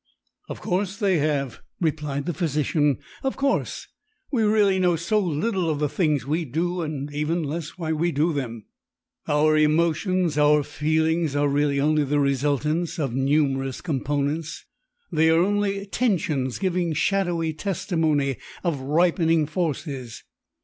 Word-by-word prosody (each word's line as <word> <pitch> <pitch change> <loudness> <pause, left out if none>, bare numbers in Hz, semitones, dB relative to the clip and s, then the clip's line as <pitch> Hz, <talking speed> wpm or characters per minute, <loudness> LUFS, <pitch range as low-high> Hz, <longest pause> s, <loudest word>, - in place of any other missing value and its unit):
"Of - - -7
course 195 0 -1
they 195 -6 +2
have," 140 -4 -1 0.2
replied 150 -4 -1
the 175 - -2
physician. 150 -3 +1 0.2
"Of 270 - -2
course! 275 0 -1 0.4
We 250 -5 +1
really 210 -3 +3
know 180 -2 +3
so 170 +6 0
little 180 +1 0
of 155 - 0
the 150 0 0
things 150 -4 0
we 155 +5 0
do 170 +6 -2
and 145 -2 -4
even 155 +3 -1
less 155 +3 -5
why 160 -3 -2
we 170 +3 0
do 155 +3 +1
them. 115 -7 -4 0.6
Our 155 +1 +3
emotions, 165 +2 +2
our 150 0 +4
feelings, 160 +1 0
are 145 0 +2
really 140 0 +1
only 150 +1 +2
the 145 +1 0
resultants 145 +5 0
of 140 -7 -2
numerous 135 -1 +1
components; 145 +1 -2 0.5
they 160 +1 +3
are 160 - +4
only 200 +1 0
tensions 165 - 0
giving 180 -3 0
shadowy 170 -1 0
testimony 155 - 0 0.3
of 170 -6 -1
ripening 165 +2 +2
forces. 150 -6 -4
155 Hz, 140 wpm, -24 LUFS, 145-175 Hz, 0.6 s, our